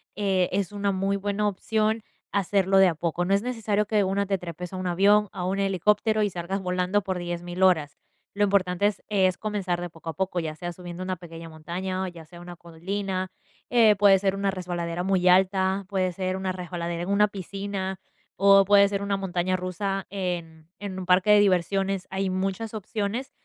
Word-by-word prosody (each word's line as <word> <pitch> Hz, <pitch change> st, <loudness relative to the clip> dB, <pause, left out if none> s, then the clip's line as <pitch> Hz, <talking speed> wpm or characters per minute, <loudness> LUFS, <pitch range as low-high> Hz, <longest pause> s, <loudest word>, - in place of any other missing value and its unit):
eh, 190 Hz, -3 st, +1 dB
es 195 Hz, 0 st, -1 dB
una 200 Hz, -1 st, -1 dB
muy 195 Hz, +1 st, 0 dB
buena 205 Hz, +1 st, -1 dB
opción 215 Hz, +2 st, 0 dB, 0.3 s
hacerlo 195 Hz, 0 st, +2 dB
de 190 Hz, 0 st, +7 dB
a 170 Hz, -, 0 dB
poco. 170 Hz, +2 st, -1 dB
No 195 Hz, -, +1 dB
es 200 Hz, -, +3 dB
necesario 220 Hz, -3 st, -1 dB
que 215 Hz, -, -1 dB
de 205 Hz, -, +4 dB
una 195 Hz, +1 st, 0 dB
te 195 Hz, 0 st, +1 dB
trepes 175 Hz, 0 st, -7 dB
a 185 Hz, -, -6 dB
un 185 Hz, 0 st, -3 dB
avión, 200 Hz, +4 st, +4 dB
a 185 Hz, -3 st, -4 dB
un 190 Hz, +2 st, -1 dB
helicóptero 210 Hz, +3 st, +2 dB
y 205 Hz, -, +1 dB
salgas 185 Hz, +2 st, -4 dB
volando 180 Hz, +2 st, 0 dB
por 190 Hz, -2 st, -3 dB
10000 175 Hz, +1 st, -3 dB
horas. 160 Hz, -7 st, +3 dB, 0.4 s
Lo 205 Hz, -, +2 dB
importante 195 Hz, -1 st, +2 dB
es 205 Hz, -2 st, -4 dB
es 190 Hz, -3 st, +2 dB
comenzar 200 Hz, -5 st, -2 dB
de 175 Hz, 0 st, -5 dB
poco 165 Hz, 0 st, -9 dB
a -, -, -3 dB
poco, 185 Hz, +2 st, -2 dB
ya 160 Hz, -2 st, -4 dB
sea 175 Hz, +3 st, -5 dB
subiendo 175 Hz, +1 st, -8 dB
una 185 Hz, -1 st, -3 dB
pequeña 165 Hz, -1 st, -10 dB
montaña, 180 Hz, +4 st, -4 dB
o -, -, -2 dB
ya 170 Hz, -3 st, -10 dB
sea 175 Hz, +2 st, -13 dB
una 175 Hz, 0 st, -9 dB
colina, 185 Hz, +3 st, -4 dB, 0.4 s
eh, 225 Hz, -4 st, +5 dB
puede 195 Hz, -1 st, +6 dB
ser 195 Hz, 0 st, 0 dB
una 200 Hz, 0 st, 0 dB
resbaladera 175 Hz, -2 st, -3 dB
muy 185 Hz, -1 st, +1 dB
alta, 190 Hz, +1 st, +3 dB
puede 185 Hz, -2 st, 0 dB
ser 185 Hz, +1 st, -2 dB
una 190 Hz, 0 st, -2 dB
resbaladera 175 Hz, -1 st, -4 dB
en 180 Hz, -, -5 dB
una 205 Hz, +1 st, +4 dB
piscina, 195 Hz, -1 st, -5 dB, 0.4 s
o 195 Hz, 0 st, +6 dB
puede 200 Hz, 0 st, +6 dB
ser 200 Hz, 0 st, -2 dB
una 200 Hz, 0 st, 0 dB
montaña 185 Hz, -1 st, -1 dB
rusa 195 Hz, +1 st, -3 dB
en 170 Hz, -5 st, -4 dB
en 200 Hz, -2 st, -6 dB
un 185 Hz, -, -5 dB
parque 185 Hz, +3 st, +3 dB
de 210 Hz, 0 st, +7 dB
diversiones. 195 Hz, 0 st, +1 dB
Hay 190 Hz, 0 st, -1 dB
muchas 195 Hz, +4 st, -2 dB
opciones. 215 Hz, +4 st, -3 dB
190 Hz, 200 wpm, -26 LUFS, 180-200 Hz, 0.4 s, de